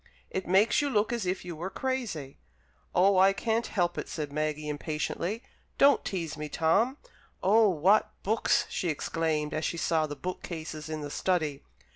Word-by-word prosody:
"It 190 - -3
makes 195 +9 +4
you 290 - 0
look 215 -2 +1
as 230 -6 -2
if 180 0 -2
you 175 -2 -5
were 175 +4 -4
crazy." 220 - -3 0.6
"Oh, 190 +1 +5
I 195 +1 +6
can't 225 +2 0
help 175 -4 0
it," - - -6
said 150 -3 -4
Maggie, 155 0 -2
impatiently. 155 - -3 0.3
"Don't 280 +1 +5
tease 165 -6 -3
me, 150 0 -5
Tom. 200 - +2 0.5
Oh, 215 +3 +5
what 190 +5 +3
books!" 220 +3 +2
she 175 - -2
exclaimed, 155 -1 -1
as 155 - -2
she 170 - -1
saw 160 -1 +1
the 145 - -6
book 185 +4 -5
cases 155 -2 -6
in 155 -1 -4
the 145 -1 -6
study. 155 -7 0
175 Hz, 175 wpm, -29 LUFS, 155-205 Hz, 0.6 s, I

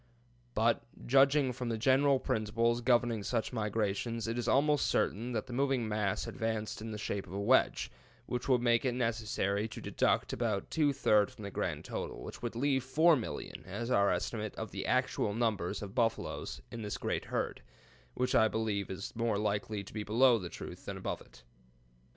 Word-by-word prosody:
But, 115 +1 +3 0.2
judging 135 0 +4
from 125 0 -4
the 115 - -1
general 135 +3 +4
principles 115 -1 0
governing 120 -2 +2
such 115 +4 -2
migrations, 110 +1 -1
it 115 - -1
is 120 -1 -2
almost 145 +2 +3
certain 115 +5 0
that 110 - -1
the 125 - -8
moving 135 -2 +1
mass 105 -2 -1
advanced 110 -1 -3
in 110 - -5
the 105 - -4
shape 100 -2 -3
of 90 - -10
a 100 - -3
wedge, 120 +6 +3 0.3
which 125 +2 -3
would 125 -2 +4
make 120 -1 +3
it 125 -2 0
necessary 110 -3 0
to 105 - -8
deduct - - +1
about 110 -4 -1
two 150 -3 +3
third 105 -6 +3
from 110 - -12
the 100 - -5
grand - - -3
total, - - -5
which - - -8
would 120 -1 -4
leave 135 +1 +1
4,000,000 135 - +1
as 120 +1 -4
our 100 -5 +4
estimate 105 +4 -2
of - - -5
the - - -4
actual 100 - +1
number 110 -7 0
of 100 -1 -5
buffaloes 115 -2 -1
in 115 - -6
this 105 -1 -3
great - - -2
herd, - - -2 0.5
which 125 0 0
I 110 - +6
believe 110 -3 -1
is 95 +1 -6
more 115 -2 +1
likely 105 0 -1
to - - -12
be 110 - -3
below 115 +3 +4
the 90 -3 -6
truth - - -9
than - - -5
above - - -4
it. 60 - -17
115 Hz, 185 wpm, -32 LUFS, 105-125 Hz, 0.5 s, I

